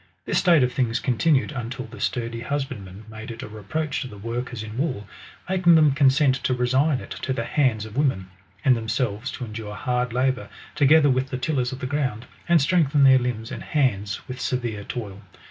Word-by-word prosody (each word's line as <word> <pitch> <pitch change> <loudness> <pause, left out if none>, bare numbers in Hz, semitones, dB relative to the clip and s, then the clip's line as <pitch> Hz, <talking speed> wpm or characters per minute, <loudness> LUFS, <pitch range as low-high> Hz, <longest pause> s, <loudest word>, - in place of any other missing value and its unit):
This - - +1
state 170 -7 +5
of 125 0 0
things 120 -3 0
continued 135 +4 +2
until 120 -2 -5
the - - -12
sturdy 115 -1 -2
husbandmen 115 -7 -5
made 110 0 -9
it 115 -1 -7
a - - -6
reproach 110 +9 -3
to 130 - -4
the 105 - -11
workers 115 +2 -4
in 110 0 -8
wool; 130 -6 -2 0.4
making 180 -2 +4
them 155 -2 +6
consent 135 0 +4
to 130 0 -1
resign 130 +3 +2
it - - -11
to 130 - -3
the 115 - -2
hands 120 -8 +1
of 110 0 -10
women, 110 -10 0 0.3
and 130 -2 +6
themselves 115 0 -2
to 125 - -5
endure 105 -1 -7
hard 125 +1 -1
labour 130 +1 0 0.2
together 150 +1 +5
vjith 130 0 +1
the 130 - -3
tillers 130 -2 -1
of 130 - -7
the - - -2
ground, 130 -4 -2 0.2
and 170 -4 +5
strengthen 150 -4 +3
their 130 -1 +7
limbs 120 -3 -3
and - - -6
hands 110 -8 -1
with 130 0 -6
severe 120 -5 -2
toil. 100 -4 -6
125 Hz, 195 wpm, -24 LUFS, 115-140 Hz, 0.4 s, their